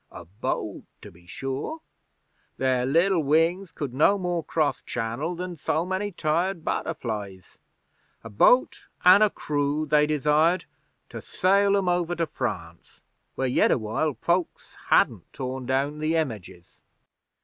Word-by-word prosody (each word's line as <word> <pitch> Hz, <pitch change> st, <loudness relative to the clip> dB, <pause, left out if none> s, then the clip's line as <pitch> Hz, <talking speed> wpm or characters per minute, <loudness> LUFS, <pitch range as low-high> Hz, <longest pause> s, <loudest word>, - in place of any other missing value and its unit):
'A -, -, -10 dB
boat, 95 Hz, +6 st, -4 dB, 0.2 s
to -, -, -12 dB
be 85 Hz, +1 st, -21 dB
sure. 135 Hz, -, -5 dB, 0.8 s
Their 130 Hz, -1 st, +1 dB
liddle 170 Hz, +5 st, +3 dB
wings 165 Hz, +5 st, +1 dB
could 145 Hz, -6 st, -5 dB
no 155 Hz, +9 st, +4 dB
more 175 Hz, -3 st, -2 dB
cross 155 Hz, -1 st, -1 dB
Channel 125 Hz, +9 st, -3 dB
than 180 Hz, 0 st, -5 dB
so 160 Hz, +2 st, -1 dB
many 190 Hz, +3 st, -2 dB
tired 170 Hz, +1 st, -1 dB
butterflies. 105 Hz, -, -4 dB, 0.6 s
A 115 Hz, -, -8 dB
boat 245 Hz, -, +3 dB, 0.2 s
an' 185 Hz, +3 st, +8 dB
a 215 Hz, -, +5 dB
crew 145 Hz, -2 st, -2 dB
they 150 Hz, 0 st, +3 dB
desired 155 Hz, +4 st, +2 dB, 0.4 s
to -, -, -8 dB
sail 200 Hz, +2 st, +2 dB
'em 195 Hz, -2 st, -1 dB
over 175 Hz, -1 st, 0 dB
to 165 Hz, 0 st, 0 dB
France, 90 Hz, -, -6 dB, 0.3 s
where 135 Hz, -, -1 dB
yet 125 Hz, -, +3 dB
awhile 125 Hz, +6 st, 0 dB
folks 175 Hz, 0 st, -2 dB
hadn't -, -, +2 dB
tore 130 Hz, 0 st, -5 dB
down 135 Hz, +4 st, -1 dB
the 155 Hz, +2 st, 0 dB
Images. 110 Hz, -, -5 dB
155 Hz, 140 wpm, -25 LUFS, 130-175 Hz, 0.8 s, an